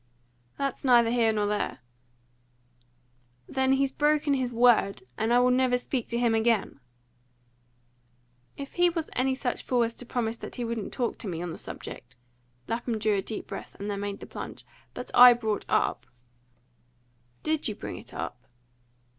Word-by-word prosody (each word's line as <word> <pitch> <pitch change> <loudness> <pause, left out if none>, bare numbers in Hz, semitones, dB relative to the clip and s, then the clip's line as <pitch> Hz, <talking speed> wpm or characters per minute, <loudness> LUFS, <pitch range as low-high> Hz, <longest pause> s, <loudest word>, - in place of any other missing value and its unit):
"That's 275 -2 -2
neither 240 -3 +5
here 235 -2 +3
nor 210 -1 0
there." 205 0 -1 1.7
"Then 265 0 +2
he's 270 0 +2
broken 295 0 +2
his 255 -2 0
word, 235 - +3
and 220 +1 0
I 240 - +5
will 250 0 +4
never 250 0 +3
speak 250 -1 -3
to 235 - -2
him 240 -1 +2
again!" 225 -8 +1 1.8
"If 280 0 -7
he 350 0 +4
was 330 -2 -4
any 260 +1 +1
such 255 -2 -2
fool 245 -2 +1
as 230 0 -2
to 245 - -8
promise 230 -2 -2
that - - -8
he 245 - -3
wouldn't 230 -3 -3
talk 245 -3 -2
to - - -4
me 170 -3 -3
on 175 -2 -4
a - - -8
subject" 125 +1 -8 0.5
Lapham 230 0 -2
drew 215 0 +1
a 195 - +1
deep 215 +2 -5
breath, - - -8
and 205 +1 -4
then 200 - -3
made 200 0 -4
the - - -6
plunge - - -8 0.3
"that 250 - -6
I 245 0 +10
brought 220 -3 -2
up - - +1 0.7
" 120 0 -39
"Did 310 -1 0
you 215 - -3
bring 90 - -6
it 110 +5 -11
up?" 125 +1 -6
235 Hz, 175 wpm, -28 LUFS, 205-255 Hz, 1.8 s, I